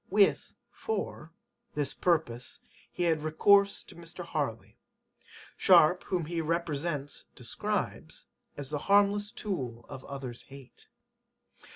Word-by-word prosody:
[With] 200 0 +3 0.2
for 445 -1 -4 0.4
this 145 -2 +1
purpose 150 -9 0 0.3
he 175 - -2
had 160 -3 +2
recourse 200 +6 +4
to - - -14
Mr. 170 +1 -8
Harley. 140 -9 -3 0.8
Sharpe, 175 +4 +6
whom 175 -4 -1
he 165 +1 -2
[represents] 155 -3 -2
describes - - -3 0.3
as 145 -1 -5
"the 150 - -1
harmless 205 +1 +4
tool 125 - -4
of 130 - -8
others' 130 -4 -6
hate." 135 -2 -13
160 Hz, 110 wpm, -30 LUFS, 140-180 Hz, 0.8 s, Sharpe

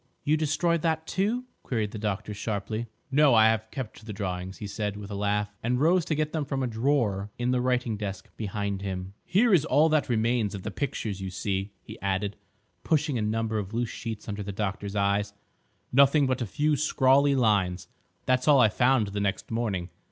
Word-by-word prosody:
"You 150 +1 +3
destroyed 160 +2 +1
that, 160 -1 0
too?" 210 +9 0 0.2
queried 110 -5 -2
the 110 - -6
doctor 105 0 -3
sharply. 110 +2 -3 0.2
"No; 140 -2 +5
I 110 0 +7
have 110 0 -1
kept 115 -4 -7
the 110 - -7
drawings," 95 -2 -4
he 105 - -6
said, 105 0 -3
with 105 0 -8
a - - -3
laugh, 105 +1 -1
and 125 +2 0
rose 170 +3 +3
to 155 - 0
get 155 0 -1
them 155 -2 0
from 135 -1 -2
a - - 0
drawer 110 -4 0
in 120 +1 0
the 125 -1 +1
writing 125 -3 0
desk 100 -2 -5
behind 100 -2 -3
him. 95 -1 -4
"Here 210 +5 +3
is 165 -6 +5
all 160 0 +4
that 155 -3 +1
remains 115 -2 +1
of 95 - -7
the - - -4
pictures, 110 -8 -3
you 95 - -3
see," 95 +1 -3
he - - -11
added, 100 +1 -1 0.5
pushing 150 -5 +1
a - - -1
number 110 +1 -1
of 100 +2 -5
loose 120 -1 0
sheets 110 -3 -6
under 105 -1 -4
the 100 0 -4
doctor's 100 0 -3
eyes; 100 0 +1 0.6
"nothing 140 +2 +5
but 130 -1 0
a 120 - -1
few 150 +8 +1
scrawly 140 -1 +3
lines. 95 -8 +1 0.4
That's 130 0 +1
all 145 -3 +7
I 110 - +6
found 120 -1 +2
the 100 +1 -3
next 100 +2 -2
morning. 100 -7 -2
110 Hz, 205 wpm, -27 LUFS, 100-140 Hz, 0.6 s, I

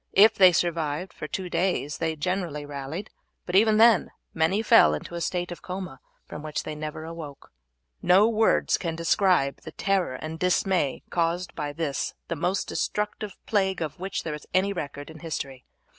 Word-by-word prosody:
If 210 +3 +7
they 185 -2 +7
survived 165 0 -1
for 155 - -6
two 185 +3 -4
days 175 -5 -1
they 160 -1 -1
generally 165 -2 -2
rallied, 145 +7 -6 0.3
but 180 - -3
even 215 +2 +5
then 225 -3 +6 0.2
many 175 +7 +1
fell 75 - +6
into 75 - -8
a 170 - -4
state 175 0 -2
of 175 - -7
coma 180 -7 -6 0.3
from 150 - -8
which 155 -1 -3
they 155 - -5
never 155 +1 -6
awoke. 160 -4 -9 0.5
No 195 +4 +5
words 225 -1 +2
can 165 -3 -3
describe 165 -4 +2
the 160 - -9
terror 195 -9 0
and 155 +4 -6
dismay 180 -5 +1
caused 170 +1 0
by 145 -1 -3
this 145 -3 -3
the 170 - -1
most 180 +5 -1
destructive 210 -1 -3
plague 190 -3 +1
of 160 -2 -4
which 190 +2 -3
there 160 - -3
is 150 - -8
any 195 +2 +3
record 145 -3 -6
in 160 - -12
history. 140 -5 -5
170 Hz, 175 wpm, -26 LUFS, 150-190 Hz, 0.5 s, If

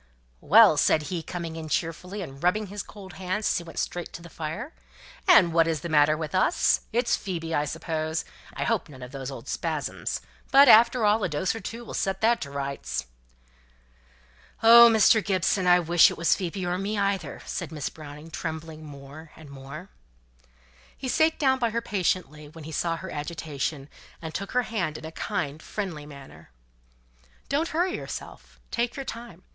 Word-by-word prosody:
"Well!" 205 -2 +7
said 155 - +3
he, 170 - -2
coming 165 -1 -6
in 160 -1 -7
cheerfully, 180 +5 -3
and 135 -4 -10
rubbing 195 +5 +1
his 205 - -3
cold 195 -3 -12
hands 190 +3 -3
as - - +2
he - - -9
went 165 -1 -12
straight 175 -1 -3
to 170 - -8
the 170 - -12
fire, 185 - -5 0.5
"and 185 - +6
what 165 -1 +4
is 160 -3 -1
the 170 - -5
matter 155 0 +4
with 155 +1 -5
us? 185 - +3
It's 235 +2 +2
Phoebe, 165 -4 -4
I 145 - +1
suppose? 160 +1 -3 0.3
I - - -2
hope - - -1
none 130 -3 -11
of 125 - -9
those 135 -2 -6
old 135 - -9
spasms? - - -3 0.3
But, 275 +1 +8
after 235 0 +6
all, 210 +1 +3
a - - 0
dose 150 +5 -1
or 225 - -6
two 230 +4 -7
will - - -8
set 190 0 -1
that 230 +2 +3
to 140 - -5
rights." 140 - -4 1.6
"Oh! 235 +1 +10
Mr. 220 0 +5
Gibson, 185 -1 +1
I 180 0 +6
wish 170 0 +5
it - - -7
was 170 -1 +3
Phoebe, 185 0 -4
or 180 +1 -1
me 205 +2 -2
either!" 195 -7 -2
said - - -5
Miss 150 -4 -3
Browning, 150 +1 -11
trembling 160 0 -6
more 145 +2 -11
and 155 -3 -13
more. 140 +6 -9 1.1
He 265 - -5
sate 315 +4 +3
down 265 -2 +2
by 235 -2 +1
her 230 +1 -1
patiently, 180 -8 -2
when 160 +1 -12
he 160 - -8
saw 165 +1 -1
her 185 +1 -8
agitation, 150 -2 -4 0.3
and 160 -1 -7
took 200 +4 -5
her 250 0 +2
hand 185 -9 -2
in - - -10
a 160 - -7
kind, 160 -6 -3
friendly 170 -8 -5
manner. 140 -2 -13 1.0
"Don't 300 +4 +1
hurry 355 +4 0
yourself, - - -9
take 235 0 -1
your 275 - -5
time. 230 -8 -8
170 Hz, 185 wpm, -26 LUFS, 155-210 Hz, 1.6 s, Oh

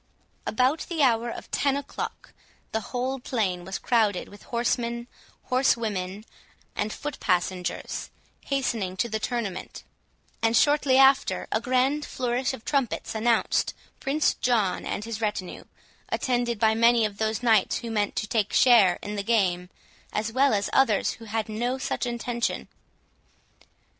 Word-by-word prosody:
About 255 +7 +1
the 325 -4 +1
hour 235 -2 +3
of - - -8
ten 280 -1 +1
o'clock, 280 - -6 0.4
the 220 - 0
whole 260 +2 -2
plain 200 -8 -1
was 190 +2 -4
crowded 215 -6 +1
with 205 - -14
horsemen, 235 0 -1 0.4
horsewomen, 215 -6 0 0.5
and 210 +1 -1
foot 295 +4 -6
passengers, 180 -1 -1 0.4
hastening 230 -9 -1
to 235 - +1
the 220 -1 -2
tournament; 215 -6 -4 0.6
and 225 0 +3
shortly 290 -2 +4
after, 270 0 +4
a 220 - +1
grand 260 +4 +1
flourish 250 -1 -1
of 260 -4 -9
trumpets 275 -5 -1
announced 225 +1 +1 0.2
Prince 295 +3 +1
John 220 -7 0
and 205 - -3
his 230 0 -5
retinue, 210 -4 -3 0.4
attended 240 -2 0
by 220 +1 +3
many 230 0 +4
of 205 -1 -5
those 220 +2 -1
knights 220 -5 +3
who 235 -2 -6
meant 210 -2 0
to - - -1
take 215 -3 0
share 215 -8 +6
in 210 - -4
the 200 - -1
game, 185 -5 +1 0.4
as 220 +1 -2
well 270 -2 +4
as 200 0 0
others 230 -7 +3
who 230 - -10
had 220 0 -2
no 240 +4 -2
such 260 - -2
intention. 240 0 -2
230 Hz, 145 wpm, -26 LUFS, 210-250 Hz, 0.6 s, share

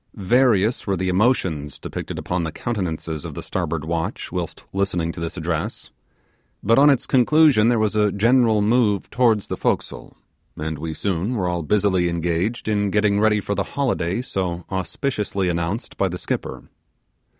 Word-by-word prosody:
Various 115 +1 +2
were 95 -1 +1
the 95 +1 -1
emotions 90 - +1
depicted - - -6
upon 90 -1 -2
the 80 - -3
countenances 80 -7 -3
of - - -7
the - - -6
starboard 80 -2 -3
watch 85 +5 -3
whilst 90 -3 -5
listening 90 -4 0
to 85 - -9
this 85 +2 -5
address; 80 -2 -3 0.7
but 115 +5 +4
on 145 +1 +7
its 135 -4 +2
conclusion 130 -3 +4
there 120 - +3
was 110 -1 +1
a 105 -1 +3
general 115 +1 +3
move 105 -3 +2
towards 115 -5 +2
the - - -4
forecastle, - - -3 0.4
and 80 -1 -4
we 80 0 -4
soon 100 +5 -1
were 95 -5 -1
all 90 -1 -1
busily 95 0 +2
engaged 85 +7 -1
in 105 -1 +1
getting 105 0 +2
ready 105 0 +3
for 100 - -3
the - - 0
holiday 120 -6 0
so 90 -7 -3
auspiciously 95 0 -2
announced 85 +6 -3
by 95 - +1
the 90 - -4
skipper. - - -4
100 Hz, 165 wpm, -22 LUFS, 85-110 Hz, 0.7 s, on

